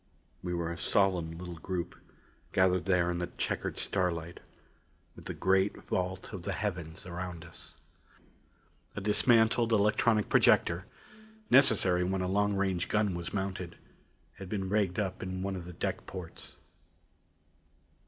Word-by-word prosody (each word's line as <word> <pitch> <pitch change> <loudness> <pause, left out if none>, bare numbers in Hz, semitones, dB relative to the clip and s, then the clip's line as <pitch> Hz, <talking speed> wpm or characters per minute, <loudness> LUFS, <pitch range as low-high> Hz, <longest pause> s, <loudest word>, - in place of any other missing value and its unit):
We 90 -1 -3
were 85 -1 -2
a 85 - -6
solemn 90 -5 +1
little 90 -1 -7
group, 90 +1 -3 0.6
gathered 90 -2 +3
there 90 -2 +2
in 85 - -2
the 90 - -2
checkered - - -2
starlight 85 -3 -1 0.8
with - - -13
the - - -4
great 95 +1 +2
vault 95 +3 -3
of 95 - -5
the 100 +3 -3
heavens 90 -5 -4
around 90 -1 -6
us. 85 - -11 1.2
A - - -2
dismantled 115 +2 +3
electronic 105 0 +3
projector - - +3 0.6
necessary 110 -9 +5
when 95 +1 -1
a - - -1
long 100 +1 +1
range 95 -3 0
gun 105 -3 +2
was 85 -1 -5
mounted 95 -3 -3 0.6
had 95 -2 -8
been 95 -2 -2
rigged 100 -3 +1
up 95 -3 -2
in 95 0 -4
one 95 0 -2
of 90 -2 -6
the 90 - -8
deck - - -3
ports. 90 -3 -9
95 Hz, 145 wpm, -31 LUFS, 90-100 Hz, 1.2 s, necessary